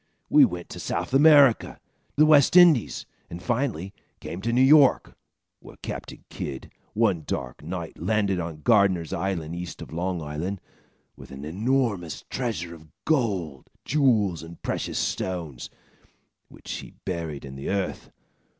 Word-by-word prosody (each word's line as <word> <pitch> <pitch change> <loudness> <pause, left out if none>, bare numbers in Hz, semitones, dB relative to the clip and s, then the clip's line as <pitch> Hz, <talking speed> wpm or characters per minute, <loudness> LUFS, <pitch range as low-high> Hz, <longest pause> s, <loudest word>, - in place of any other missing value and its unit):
We - - +8
went 90 0 -5
to - - -8
South - - -3
America, 140 -3 +5 0.4
the 155 - +5
West 150 0 +5
Indies, 165 - +5 0.2
and 85 - -7
finally 110 - -2 0.3
came 90 - -7
to 115 +3 -1
New 125 +2 +4
York, 140 0 +5 0.4
where - - -14
Captain - - -7
Kidd, 70 -2 -6 0.2
one 105 -7 +2
dark - - -4
night, 85 +1 -6
landed 100 +1 0
on 80 -3 -6
Gardiner's 100 -7 +3
Island, 85 -4 -3
east 90 0 -7
of - - -9
Long 90 +2 -2
Island, 80 +6 -4 0.6
with - - -13
an 70 +1 -8
enormous 105 - -1
treasure 100 -10 -3
of 80 -1 -14 0.2
gold, 100 - -1 0.2
jewels 115 - +2
and 80 +1 -11
precious - - -3
stones, 85 -9 -3 0.8
which - - -11
he - - -7
buried 80 -6 -4
in 65 - -9
the 70 +1 -6
earth. 100 -1 -3
95 Hz, 140 wpm, -25 LUFS, 80-120 Hz, 0.8 s, We